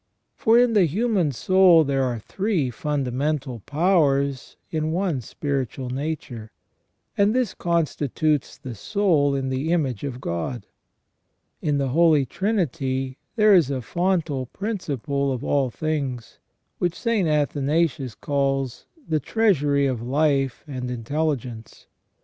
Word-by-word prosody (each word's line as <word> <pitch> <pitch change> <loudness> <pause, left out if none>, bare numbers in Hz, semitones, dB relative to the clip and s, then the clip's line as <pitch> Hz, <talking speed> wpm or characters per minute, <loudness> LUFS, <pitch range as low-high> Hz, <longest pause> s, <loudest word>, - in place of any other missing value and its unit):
For 225 +1 +4
in 245 -1 +4
the 200 -4 +5
human 195 - +1
soul 180 +4 +5
there 135 -2 0
are 125 -2 0
three 175 - -1
fundamental 135 0 -2
powers 140 -5 +1 0.2
in 155 -1 -1
one 170 -6 -1
spiritual 135 0 -3
nature, 130 -5 -4 0.7
and 205 +3 +3
this 250 -7 +1
constitutes 155 -3 0
the 130 - -7
soul 155 - +1
in 135 -1 -2
the 135 +5 -1
image 140 -10 0
of 130 -3 -4
God. 100 +3 -4 1.0
In 145 -2 +1
the 135 -1 0
Holy 155 -1 +4
Trinity 135 - -2 0.2
there 215 -2 +5
is 170 -8 +5
a 135 -2 -1
fontal 170 -6 -1
principal 140 - -2
of 125 -2 -3
all 140 -3 +1
things, 135 -4 -4 0.4
which 175 -1 0
St. 230 -7 +1
Athanasius 145 -3 0
calls 135 -3 -1
" 310 - -27
the 155 -1 +1
treasury 145 - +2
of 130 -4 -1
life 135 0 +1
and 130 -3 -5
intelli 145 +6 -1
gence 115 -3 -11
145 Hz, 130 wpm, -23 LUFS, 130-170 Hz, 1.0 s, the